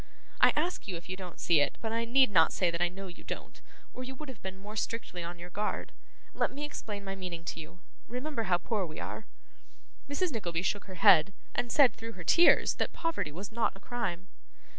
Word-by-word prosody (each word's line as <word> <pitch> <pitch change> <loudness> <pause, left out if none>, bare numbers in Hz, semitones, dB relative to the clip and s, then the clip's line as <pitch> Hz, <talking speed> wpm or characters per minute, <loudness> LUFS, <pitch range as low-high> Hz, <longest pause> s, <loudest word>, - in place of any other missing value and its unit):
I - - +8
ask 340 -2 -1
you 190 - -3
if 170 +1 -9
you 185 - -2
don't 185 -2 -9
see 170 -3 +4
it, 145 - +1
but 220 - -3
I 230 +1 0
need 260 0 +5
not 165 -4 +6
say 180 -3 +2
that 170 0 -2
I 175 - +4
know 195 +2 -8
you 175 -2 -10
don't, - - -7 0.3
or 255 - -6
you 260 +1 -6
would 300 +1 -8
have 245 -6 -10
been 190 0 -6
more 205 +2 -9
strictly 215 -4 -3
on 170 +1 -5
your 175 +1 -9
guard. 210 +4 -2 0.4
Let - - +1
me 285 +2 -6
explain 210 -8 -6
my 195 0 -4
meaning 180 -3 -6
to 165 - -4
you. 160 +3 -10 0.3
Remember 250 -1 -3
how 175 - +5
poor 205 +3 -1
we 155 - -8
are.' - - -6 0.8
Mrs. 335 +5 0
Nickleby 175 -8 -2
shook 205 +1 -1
her 190 - -9
head, 195 -1 +6 0.2
and 245 - -1
said, 280 -5 +6
through 230 0 -7
her 185 - -8
tears, 340 - +6
that - - -1
poverty 330 - -1
was 190 +7 -7
not 230 +1 +1
a - - -14
crime. 195 -6 -3
200 Hz, 225 wpm, -31 LUFS, 175-240 Hz, 0.8 s, I